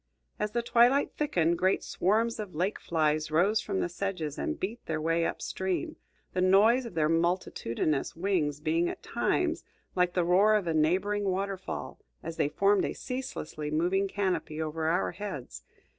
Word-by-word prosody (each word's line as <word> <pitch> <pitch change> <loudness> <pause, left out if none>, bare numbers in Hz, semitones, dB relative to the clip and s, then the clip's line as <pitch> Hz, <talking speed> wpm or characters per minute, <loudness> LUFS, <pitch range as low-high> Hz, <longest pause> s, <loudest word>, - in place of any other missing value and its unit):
As 210 0 -2
the 235 - 0
twilight 245 +4 +4
thickened, 170 - +1
great 185 +1 +2
swarms 225 +5 +1
of 205 -6 -6
lake 185 +6 -1
flies 155 -2 0
rose 190 +8 +3
from 195 -2 -2
the - - 0
sedges 175 -4 -4
and 320 -1 -2
beat 220 +6 -4
their 160 -1 -1
way 165 +1 +1
up - - -5
stream, 190 - -2 0.4
the 185 - 0
noise 215 +7 +5
of 215 - -11
their 155 -2 +2
multitudinous 165 -5 0
wings 165 -5 0
being 165 +3 +1
at - - -7
times - - 0 0.3
like 180 -1 +1
the 175 -2 +2
roar 195 +5 +5
of 205 -3 +1
a 165 - 0
neighboring 190 +7 +1
waterfall, 195 0 -3 0.2
as 165 0 -6
they 145 - +1
formed 200 +4 +3
a - - -1
ceaselessly 160 - -5
moving 180 +6 +1
canopy 190 -5 -2
over 160 0 -2
our 170 +2 +1
heads. 160 - -7
185 Hz, 170 wpm, -29 LUFS, 160-205 Hz, 0.4 s, noise